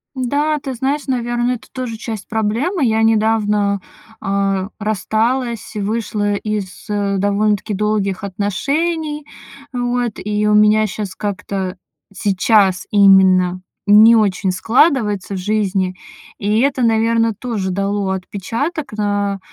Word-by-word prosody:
Да, 290 +4 0
ты 270 -1 -5
знаешь, 275 +4 -2
наверно, 240 -1 0
это 245 - -8
тоже 250 -4 -5
часть 220 -2 -6
проблемы. 235 - 0
Я 220 -1 +2
недавно, 210 -3 +2 0.4
а, 195 0 -1
рассталась, 225 +3 -1
вышла 205 -1 -1
из, 205 -3 -4
э, 200 -1 0
довольно-таки 205 +1 0
долгих 205 -1 -1
отношений, 295 - -2 0.5
вот. 245 -2 -1
И 210 0 -1
у 210 - +3
меня 210 +1 +5
щас 205 -1 -5
как-то 195 -2 -4 0.4
сейчас 195 -1 +2
именно 190 -2 +5 0.2
не 215 +3 +7
очень 200 -3 +1
складывается 210 - +1
в - - -3
жизни, 195 -1 0 0.4
и 210 +3 +1
это, 270 -2 +1
наверно, 230 0 +2
тоже 220 -6 -3
дало 200 +1 -1
отпечаток 225 - -4
на, 205 -1 -1
210 Hz, 115 wpm, -18 LUFS, 200-235 Hz, 0.5 s, не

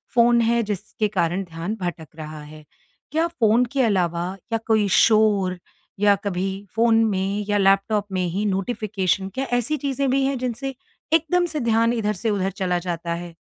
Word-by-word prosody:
Phone 235 0 +5
है 235 +1 +2
जिसके 210 +1 -3
कारण 185 -1 0
ध्यान 170 +4 -5
भटक 170 -3 -4
रहा 155 -1 -8
है। 155 +1 -12 0.5
क्या 320 +3 +1
फ़ोन 240 -7 +2
के 275 - +2
अलावा 175 -6 +1 0.3
या - - +3
कोई 220 -2 +3
शोर 210 -4 +3 0.4
या 205 -1 +5
कभी 190 -2 -1 0.3
फ़ोन 225 0 +4
में 200 0 -1
या 205 - +2
लैपटॉप 195 +1 +2
में 185 -1 0
ही 195 +5 -2
नोटिफ़िकेशन 195 -2 -1
क्या 270 - -1
ऐसी 275 +6 -2
चीज़ें 275 -1 -1
भी 270 +1 +2
हैं 270 -1 0
जिनसे 255 +2 -3 0.4
एकदम 335 +2 +3
से 315 -3 -3
ध्यान 230 -1 +2
इधर 210 -2 0
से 220 +3 -2
उधर 195 -2 0
चला 180 -2 -1
जाता 170 -1 -3
है? 170 0 -7
210 Hz, 175 wpm, -23 LUFS, 185-235 Hz, 0.5 s, फ़ोन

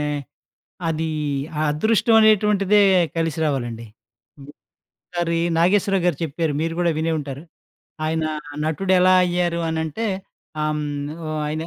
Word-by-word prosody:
ఆహ్, 150 -1 -2 0.7
అది 160 0 -1 0.5
ఆ - - +1
అదృష్టం 220 +8 +2
అనేటువంటిదే 210 -1 +4 0.4
కలిసి 165 -1 -1
రావాలండి. 120 -5 -2 0.5
హ్మ్. 140 +1 -12 0.6
ఒక - - -75
సారి 170 -1 0 0.2
'నాగేశ్వరరావుగారు' 180 -2 +2
చెప్పారు, 160 +1 -2
మీరు 165 0 -1
కూడా 175 -1 +2
వినే 165 +1 0
ఉంటారు. 140 -1 -6 0.6
ఆయన 160 0 -1 0.4
నటుడెలా 185 +3 +3
అయ్యారు 175 -1 0
అనంటే, 160 +6 -2 0.6
ఆహ్, 155 0 0
హ్మ్. 145 -1 -4 0.2
ఓ - - -4 0.2
ఆయన 155 +1 -3
165 Hz, 125 wpm, -22 LUFS, 150-185 Hz, 0.7 s, అనేటువంటిదే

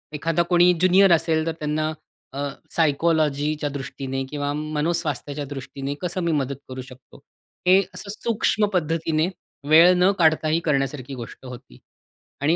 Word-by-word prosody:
एखादा 165 +3 0
कोणी 175 0 +5
ज्युनियर 185 +2 +5
असेल, 160 -1 +1
तर - - +1
त्यांना 155 +1 -1 0.4
अ, 140 +1 -3 0.2
सायकॉलॉजीच्या 150 -1 +1
दृष्टीने 135 -1 -5
किंवा 145 0 -3
मनोस्वास्थ्याच्या 150 -1 -2
दृष्टीने 135 0 -5
कसं 180 0 -2
मी 170 - +1
मदत 140 -3 -1
करू 130 0 -6
शकतो? 130 0 -15 0.5
हे 185 +1 +7 0.2
असं 200 - -4
सूक्ष्म 220 -2 +1
पद्धतीने 160 -1 0 0.4
वेळ 165 +4 +7
न 180 +2 +4
काढताही 160 -1 +3
करण्यासारखी 135 -2 -1
गोष्ट 120 +1 -10
होती. 125 - -11 0.6
आणि 155 +4 +3
155 Hz, 135 wpm, -23 LUFS, 140-165 Hz, 0.6 s, हे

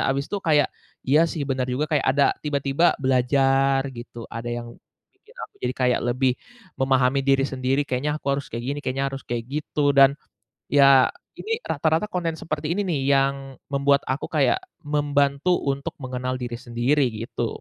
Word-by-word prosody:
habis 140 +1 0
itu 205 - -2
kayak, 150 -3 +3 0.4
iya 145 +4 +5
sih 160 -4 -4
benar 130 -1 -1
juga, 130 +4 0
kayak 150 -3 +1
ada 140 +1 +3 0.2
tiba-tiba 145 +2 +1
belajar 135 +1 +2
gitu, 120 -1 -9
ada 115 +1 -5
yang 120 0 -5 0.4
bikin - - -23
aku - - -54
jadi 125 +1 -1
kayak 125 -1 +2
lebih 130 +1 +2 0.5
memahami 135 0 +2
diri 135 0 +3
sendiri, 135 +2 -1
kayaknya 145 +4 -1
aku 155 - -13
harus 140 0 -3
kayak 115 +1 -5
gini, 145 - -5
kayaknya 135 +1 -2
harus 135 - -6
kayak 120 -1 -2
gitu, 150 -1 0
dan 135 0 +6 0.6
iya 140 -2 +6 0.3
ini 455 +1 -3
rata-rata 160 +6 +1
konten 170 -4 -2
seperti 155 -1 -4
ini 205 +4 0
nih 160 -6 -1
yang 135 0 +3 0.4
membuat 140 0 +3
aku 130 +2 -2
kayak 155 - +2 0.3
membantu 145 +1 +1 0.2
untuk 140 0 -2
mengenal 130 -1 -3
diri 120 -1 -5
sendiri, 125 +4 0 0.2
gitu. 120 - -3
135 Hz, 165 wpm, -24 LUFS, 130-145 Hz, 0.6 s, dan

